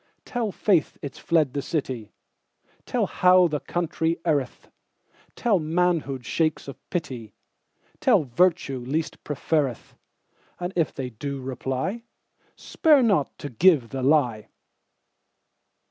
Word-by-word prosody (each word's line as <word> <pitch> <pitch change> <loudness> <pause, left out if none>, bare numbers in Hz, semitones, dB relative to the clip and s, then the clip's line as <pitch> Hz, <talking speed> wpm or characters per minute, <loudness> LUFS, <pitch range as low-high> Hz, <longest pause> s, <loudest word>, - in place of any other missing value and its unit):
Tell 235 -4 -2
faith 185 -5 +1
it's 140 - -7
fled 155 -6 +1
the 145 - -1
city; 130 -9 -3 0.8
Tell - - +1
how 180 0 +5
the 150 -2 -2
country 165 0 -1
erreth; 145 -6 -1 0.7
Tell, 220 -6 +2
manhood 160 -5 0
shakes 155 +2 0
off 140 - -8
pity; 125 - -5 0.6
Tell, 245 - +4
virtue 150 0 +1
least 145 +6 -3
preferreth:And 150 - -4
if 165 -4 +1
they 130 -2 -5
do 140 +5 -5
reply, 130 - -3 0.5
Spare 300 -6 +3
not 195 - +1
to 145 - -6
give 145 -2 +4
the 135 -1 -4
lie. 125 -6 +2
155 Hz, 115 wpm, -25 LUFS, 130-180 Hz, 0.8 s, how